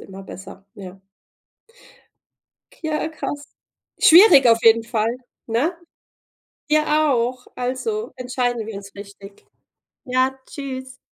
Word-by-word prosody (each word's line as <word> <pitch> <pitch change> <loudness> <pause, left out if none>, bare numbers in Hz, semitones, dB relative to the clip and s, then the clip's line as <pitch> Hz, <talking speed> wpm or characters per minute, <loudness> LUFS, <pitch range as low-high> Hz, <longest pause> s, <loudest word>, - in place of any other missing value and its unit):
immer 195 0 -11
besser, 195 +1 -12
ja. 190 -1 -11 1.8
Ja, 310 -1 -2
krass. 290 -2 -6 0.6
Schwierig 335 - +8
auf 230 -1 +5
jeden 225 0 +5
Fall, 230 0 -1 0.3
ne? 275 +10 -1 0.9
Dir 305 0 +3 0.3
auch. 250 0 -1
Also, 345 - -3
entscheiden 245 -2 -2
wir 225 - -7
uns 200 0 -10
richtig. 200 0 -13 0.6
Ja, 260 +1 0
tschüss. 260 -2 -7
250 Hz, 105 wpm, -21 LUFS, 215-275 Hz, 1.8 s, Schwierig